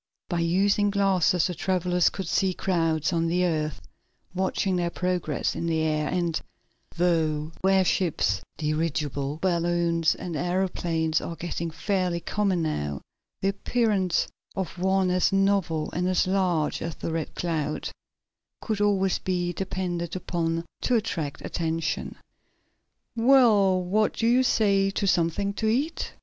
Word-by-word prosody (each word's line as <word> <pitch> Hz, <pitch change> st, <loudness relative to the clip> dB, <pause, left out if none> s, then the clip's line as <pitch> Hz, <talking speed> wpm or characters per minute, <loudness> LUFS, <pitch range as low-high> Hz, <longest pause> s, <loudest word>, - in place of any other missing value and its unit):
By 175 Hz, -, -1 dB
using 200 Hz, +4 st, +2 dB
glasses 195 Hz, -3 st, +2 dB
the 180 Hz, -, -1 dB
travelers 180 Hz, -1 st, +1 dB
could 190 Hz, -3 st, -6 dB
see 185 Hz, +1 st, +1 dB
crowds 165 Hz, -2 st, 0 dB
on 165 Hz, 0 st, +1 dB
the 180 Hz, +2 st, +1 dB
earth 155 Hz, -4 st, -1 dB, 0.5 s
watching 190 Hz, 0 st, 0 dB
their 175 Hz, -1 st, 0 dB
progress 180 Hz, -5 st, -1 dB
in 170 Hz, -, -3 dB
the 160 Hz, -1 st, +1 dB
air, 155 Hz, -1 st, 0 dB
and, 170 Hz, -3 st, -1 dB, 0.6 s
though 160 Hz, -3 st, +1 dB
airships, 185 Hz, -, +2 dB, 0.2 s
dirigible 150 Hz, -2 st, -1 dB
balloons 170 Hz, -2 st, +1 dB
and 175 Hz, -3 st, -6 dB
aeroplanes 170 Hz, -2 st, 0 dB
are 170 Hz, -, -5 dB
getting 170 Hz, 0 st, -4 dB
fairly 180 Hz, 0 st, -1 dB
common 190 Hz, 0 st, 0 dB
now, 75 Hz, -, -2 dB, 0.4 s
the 195 Hz, -, +2 dB
appearance 200 Hz, -2 st, +1 dB, 0.3 s
of 185 Hz, -2 st, -4 dB
one 190 Hz, 0 st, +2 dB
as 180 Hz, 0 st, +2 dB
novel 195 Hz, -5 st, +1 dB
and 180 Hz, +2 st, -1 dB
as 185 Hz, -, +2 dB
large 185 Hz, -5 st, 0 dB
as 165 Hz, -2 st, -4 dB
the 165 Hz, -, -4 dB
Red 160 Hz, -1 st, -3 dB
Cloud 155 Hz, -3 st, -2 dB, 0.7 s
could 215 Hz, -3 st, -2 dB
always 195 Hz, -2 st, +2 dB
be 175 Hz, -1 st, -1 dB
depended 175 Hz, -2 st, -3 dB
upon 165 Hz, -2 st, -2 dB, 0.2 s
to 250 Hz, -, +1 dB
attract 170 Hz, -10 st, -2 dB
attention. 165 Hz, -1 st, -2 dB, 1.0 s
"Well, 225 Hz, -6 st, +5 dB
what 210 Hz, +4 st, +1 dB
do 225 Hz, -, -2 dB
you 245 Hz, +2 st, +4 dB
say 200 Hz, -5 st, +3 dB
to 195 Hz, -, -2 dB
something 185 Hz, +2 st, +1 dB
to 220 Hz, -, -2 dB
eat?" 275 Hz, +9 st, -1 dB
180 Hz, 135 wpm, -26 LUFS, 165-195 Hz, 1.0 s, Well